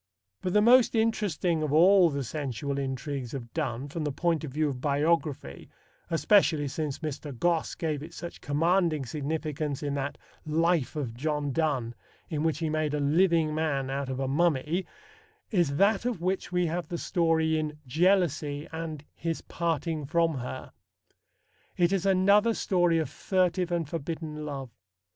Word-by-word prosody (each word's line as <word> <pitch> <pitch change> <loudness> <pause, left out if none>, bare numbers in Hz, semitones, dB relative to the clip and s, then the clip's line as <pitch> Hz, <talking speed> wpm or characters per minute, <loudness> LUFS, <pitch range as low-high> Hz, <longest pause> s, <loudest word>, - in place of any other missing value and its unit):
But 185 -1 -2
the 210 - +5
most 245 +1 +6
interesting 205 -7 +1
of 155 -2 -1
all 180 +3 +6
the 140 -2 -2
sensual 140 +1 -3
intrigues 135 -1 -4
of 115 -4 -7
Donne, 120 +4 -2
from 155 +3 -4
the 150 - -1
point 165 +2 0
of 155 - -4
view 155 +3 +1
of 125 -3 -5
biography, 145 - 0 0.4
especially 165 -3 +3
since 145 0 -3
Mr. 150 0 -5
Gosse 170 +3 0
gave 155 -4 -2
it 165 +3 -9
such 170 0 -8
commanding 165 0 +1
significance 150 +1 -3
in 145 -1 -1
that 140 0 -3 0.3
Life 165 -1 +1
of 135 -7 -3
John 145 +2 -2
Donne 135 -6 0 0.4
in 150 -2 -1
which 160 -1 +1
he 165 - -2
made 155 -1 0
a - - -1
living 160 +1 +3
man 140 -4 -1
out 140 0 -2
of 130 0 -3
a 135 - -1
mummy, 160 +3 +1 0.6
is 170 -9 +2
that 200 +6 +3
of 240 -6 -2
which 185 +1 -2
we 180 0 +2
have 170 +2 -2
the 175 - -4
story 160 -3 +1
in 150 -1 -4
Jealousy 155 -1 +1
and 160 -2 -5
His 165 -1 -3
Parting 165 -3 -2
from 165 -2 +1
Her. 125 +1 -6 1.1
It 175 +1 +3
is 195 0 0
another 200 +4 +4
story 175 -3 +2
of 160 -3 0
furtive 180 +4 0
and 170 -3 0
forbidden 155 0 -5
love. 135 -4 -5
155 Hz, 160 wpm, -28 LUFS, 145-175 Hz, 1.1 s, most